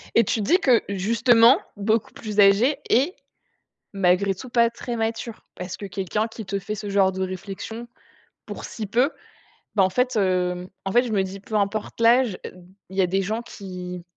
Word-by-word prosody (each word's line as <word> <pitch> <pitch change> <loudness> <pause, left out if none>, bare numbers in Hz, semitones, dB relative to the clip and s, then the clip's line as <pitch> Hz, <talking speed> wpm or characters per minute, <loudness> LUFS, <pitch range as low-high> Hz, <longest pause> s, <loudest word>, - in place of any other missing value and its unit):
Et 230 - +6
tu 225 - -1
te - - -2
dis 360 - +4
que, 255 -9 +3
justement, 230 +5 +4 0.2
beaucoup 215 +2 0
plus 210 -1 -5
âgé 205 +8 +5
et 280 +10 +2 0.8
malgré 195 0 +2
tout 245 +7 -10
pas 235 -1 +3
très 235 +1 -5
mature, 225 0 -3
parce 180 0 -6
que 205 - -7
quelqu'un 195 +3 -2
qui 225 0 -8
te 200 +1 -3
fait 205 +2 -5
ce 210 -1 -6
genre 195 -1 +3
de 190 0 -4
réflexion, 195 +5 -6 0.6
pour - - -7
si 215 -2 -6
peu, 245 +8 +2 0.6
ben, 200 - +5
en 185 - +3
fait, 250 +6 0
heu, 180 -2 0 0.2
en 195 - -1
fait, 240 +4 +4
je 245 - -4
me 195 -2 +2
dis: 190 +1 -7
«Peu 215 +2 -7
importe 210 +2 -1
l'âge, 235 -3 +4
e - - -6 0.4
il 190 - -10
y - - +4
a 185 - +3
des 195 +2 0
gens 215 +4 -2
qui 180 -5 -8
205 Hz, 200 wpm, -23 LUFS, 190-230 Hz, 0.8 s, Et